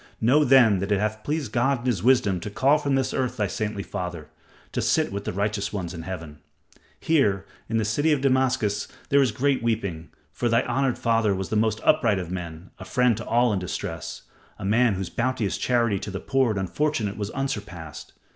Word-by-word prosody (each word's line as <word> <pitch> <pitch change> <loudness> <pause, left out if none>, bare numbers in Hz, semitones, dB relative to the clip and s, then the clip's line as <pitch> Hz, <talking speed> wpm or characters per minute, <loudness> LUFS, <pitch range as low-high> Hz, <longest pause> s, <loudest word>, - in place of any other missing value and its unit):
Know 130 +7 +4
then 125 -7 +5
that 100 +2 -3
it 100 - +3
hath 110 +1 -2
pleased 145 -5 -2
God 125 +2 +1
in - - -10
his 125 -6 0
wisdom 120 -7 +3
to 95 - -6
call 140 +8 +3
from 140 -2 0
this 130 -1 0
earth 130 -2 -1
thy 105 - +1
saintly 105 +1 -3
father, 90 -6 -6 0.4
to - - -1
sit - - +1
with 100 +1 -5
the - - -2
righteous 100 +1 -1
ones 90 -4 -4
in 85 - -6
Heaven. 80 -4 -7 0.6
Here 105 -12 +2 0.2
in 115 - 0
the 110 - +1
city 145 +9 +1
of 150 - +3
Damascus 130 -6 +1 0.2
there 140 0 +5
is 130 -4 +2
great 135 +4 +1
weeping, 100 -8 -2 0.2
for 120 - -1
thy 115 +2 +3
honored 130 +1 0
father 115 -4 +2
was 95 -1 -4
the - - -1
most 110 0 +1
upright 115 -9 +3
of 90 -2 -5
men, 85 -1 -6
a - - -7
friend 125 -2 +2
to 115 - -6
all 120 -1 +3
in 100 - 0
distress, 90 -3 -5 0.3
a - - -6
man 110 +1 +3
whose 95 -2 -4
bounteous 120 -4 -1
charity 115 -5 +1
to - - -6
the 100 -1 -4
poor 135 -2 +1
and 105 -3 -1
unfortunate 110 - -1
was 100 -1 -4
unsurpassed. 105 - -5
110 Hz, 210 wpm, -25 LUFS, 100-130 Hz, 0.6 s, then